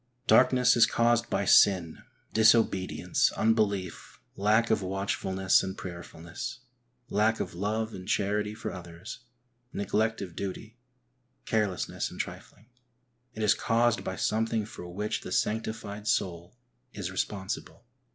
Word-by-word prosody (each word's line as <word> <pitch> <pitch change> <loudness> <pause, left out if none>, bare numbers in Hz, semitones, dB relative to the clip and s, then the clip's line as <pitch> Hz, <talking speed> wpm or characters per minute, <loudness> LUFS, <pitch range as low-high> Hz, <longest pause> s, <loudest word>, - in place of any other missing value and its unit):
Darkness 125 -1 +5
is 115 -2 +6
caused 120 0 +2
by - - 0
sin; 90 -5 +4 0.3
disobedience, 110 -4 +3
unbelief, 105 -5 -1 0.2
lack 110 +3 +2
of - - +2
watchful 95 0 -2
ness 95 0 +3
and 95 0 -5
prayerfulness, 85 +7 -7 0.5
lack 110 +2 +2
of - - -4
love 110 +4 -2
and 95 0 -9
charity 105 +1 0
for - - -5
others, 90 +5 -9 0.5
neglect 110 +2 0
of 90 -4 -7
duty, 105 +3 -6 0.7
carelessness 105 -5 -1
and - - -11
trifling. 110 - -7 0.7
It 110 - -3
is 105 - +5
caused 115 0 +1
by 95 - -4
something 110 +2 0
for 90 -4 -9
which 105 +4 -3
the - - -8
sanctified 110 -1 -2
soul 90 -1 -1 0.4
is 95 -3 -5
responsible. 95 +4 -4
105 Hz, 125 wpm, -28 LUFS, 95-110 Hz, 0.7 s, is